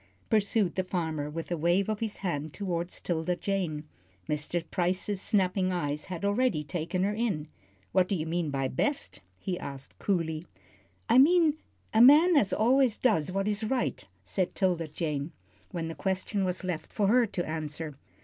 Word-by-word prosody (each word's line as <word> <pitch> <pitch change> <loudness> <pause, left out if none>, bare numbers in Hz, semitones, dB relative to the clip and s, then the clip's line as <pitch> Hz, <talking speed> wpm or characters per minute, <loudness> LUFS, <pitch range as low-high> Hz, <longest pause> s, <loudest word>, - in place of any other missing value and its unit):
pursued 210 -2 +2
the 185 - 0
farmer, 160 -5 -2
with 165 +3 -6
a - - +2
wave 175 +5 +2
of 215 -1 -1
his 220 -2 -3
hand 155 -3 -2
toward 175 -3 -2
'Tilda 175 0 -2
Jane. 175 -6 -2 0.4
Mr. 150 +3 -2
Price's 185 +2 0
snapping 185 -2 +1
eyes 150 -4 -2
had 185 +1 -5
already 205 -5 +2
taken 170 +5 -2
her 205 +2 +1
in. 205 -9 -1 0.4
"What 185 -1 +3
do 200 - 0
you 160 -3 -2
mean 165 -1 -1
by 135 -1 -1
best?" 280 - -1 0.2
he 185 -3 -3
asked, 135 -1 -7
coolly. 165 -4 -1 0.6
"I 235 +3 +6
mean 315 +1 +5 0.4
a 220 - +5
man 305 +8 +8
as 215 -9 +4
always 250 +1 +3
does 195 - +2
what 195 +2 -1
is 210 +1 -1
right," 245 +3 -1 0.2
said 185 -2 -2
'Tilda 175 -4 +1
Jane, 150 0 -3 0.4
when 165 -2 -3
the 165 - -4
question 190 +5 -1
was 180 +1 -2
left 180 -4 -4
for 210 - 0
her 235 +3 +4
to 175 -3 -3
answer. 155 -1 -4
185 Hz, 170 wpm, -29 LUFS, 160-210 Hz, 0.6 s, man